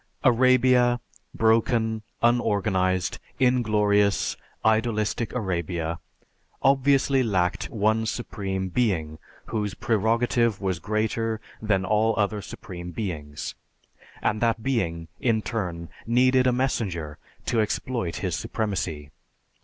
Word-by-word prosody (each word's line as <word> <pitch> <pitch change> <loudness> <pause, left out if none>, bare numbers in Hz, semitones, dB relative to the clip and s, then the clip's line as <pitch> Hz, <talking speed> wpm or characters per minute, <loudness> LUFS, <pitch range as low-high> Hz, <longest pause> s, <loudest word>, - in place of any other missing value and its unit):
Arabia, 125 -1 +4 0.3
broken, 110 0 +2 0.2
unorganized, 95 -6 +1 0.2
inglorious, 105 -5 +2 0.3
idolistic 110 0 +1
Arabia, 85 -6 -2 0.6
obviously 135 0 +4
lacked 95 -7 0
one 110 -1 +1
Supreme 95 -5 -3
Being 85 -8 0 0.3
whose 105 -3 -2
prerogative 115 0 +1
was 95 -3 -1
greater 110 +2 -1 0.2
than 100 -3 +1
all 110 +2 +2
other 105 0 0
Supreme 90 -3 -8
Beings, 75 -7 -5 0.7
and 105 - 0
that 115 -2 +1
Being, 85 -11 -1
in 110 -3 +1
turn, 90 -8 -3 0.2
needed 130 +2 +4
a - - +4
messenger 95 - -2 0.3
to 115 - +2
exploit 110 -3 -2
His - - 0
supremacy. 90 -9 -3
110 Hz, 100 wpm, -25 LUFS, 95-120 Hz, 0.7 s, Arabia